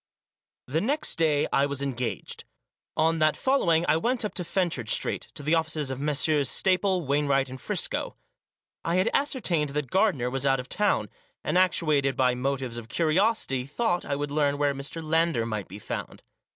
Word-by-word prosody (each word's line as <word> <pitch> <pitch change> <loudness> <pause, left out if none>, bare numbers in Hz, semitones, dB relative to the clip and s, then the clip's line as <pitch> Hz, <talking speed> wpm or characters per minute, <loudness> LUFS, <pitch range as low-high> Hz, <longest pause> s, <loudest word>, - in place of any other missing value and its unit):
The 155 +6 -1
next 295 +7 0
day 155 -3 +2
I 140 +1 +3
was 140 -1 -3
engaged. 125 -7 -4 0.5
On 160 +1 +2
that 155 -1 +3
following 175 -12 +2
I - - +4
went 235 +6 0
up 205 - -4
to 180 - -4
Fenchurch 170 - -1
Street, - - -1
to 145 - -6
the 155 +3 +1
offices 160 -4 0
of 130 - -4
Messrs. 145 0 +1
Staple, 185 -2 +2
Wainwright 140 -1 +1
and 130 0 -9
Friscoe. - - -2 0.7
I 170 - 0
had 185 +4 +2
ascertained 185 - 0
that 150 -4 -2
Gardiner 145 - +2
was 135 0 -2
out 135 -1 +3
of 125 - -6
town, 195 - +1 0.4
and - - -1
actuated 155 -7 +2
by 125 -1 +3
motives 130 -1 -2
of 115 -1 -12
curiosity 165 - +1
thought 175 +3 0
I 140 - -2
would 145 0 -3
learn 145 -1 +1
where 145 -1 +1
Mr. 140 +4 -6
Lander 160 -6 +1
might 110 -3 -4
be 95 - -9
found. 105 - -6
150 Hz, 180 wpm, -27 LUFS, 135-175 Hz, 0.7 s, I